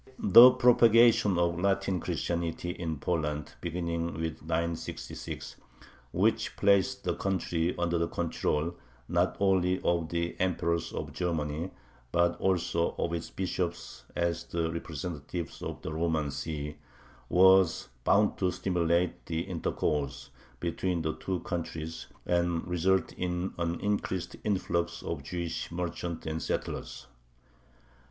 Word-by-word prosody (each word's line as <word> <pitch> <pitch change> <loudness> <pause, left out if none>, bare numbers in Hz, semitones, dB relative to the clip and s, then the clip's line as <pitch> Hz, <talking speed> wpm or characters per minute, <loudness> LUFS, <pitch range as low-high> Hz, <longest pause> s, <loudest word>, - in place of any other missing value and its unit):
The 115 +6 +10
propagation 115 -5 +5
of 85 0 +1
Latin 95 -1 +1
Christianity 85 +1 -2
in 80 -3 -4
Poland 75 -2 -2
(beginning 85 -1 -2
with 80 -1 -3
966), 85 +1 -4 0.5
which - - +1
placed 100 -2 +3
the - - 0
country 90 -3 -1
under 85 -1 +1
the 85 - +1
control 85 -1 -1 0.3
not - - +1
only 95 -2 +3
of 85 -2 +1
the 85 +1 -2
emperors 85 -2 0
of - - -5
Germany 80 -1 -2 0.4
but 85 +2 +3
also 85 -2 +1
of 85 - -1
its 85 -1 -3
bishops 90 -2 -3
as 85 -1 0
the 85 -1 -1
representatives 85 0 -5
of - - -6
the 80 - -4
Roman 80 -3 0
See, 75 0 -4 0.5
was 95 -1 +5
bound 105 +8 +3
to 95 - +2
stimulate 90 -1 0
the 80 0 -1
intercourse 75 -6 -2 0.3
between 85 0 -1
the 80 0 0
two 95 -3 -3
countries 80 -2 -5 0.2
and 85 -1 +1
result 90 +2 +2
in 90 +1 -2
an 85 0 -1
increased 95 -4 -1
influx 85 -4 -1
of 80 -4 -3
Jewish 85 +4 -4
merchants 85 -1 -4
and 80 0 -3
settlers. - - -4
85 Hz, 120 wpm, -30 LUFS, 80-90 Hz, 0.5 s, The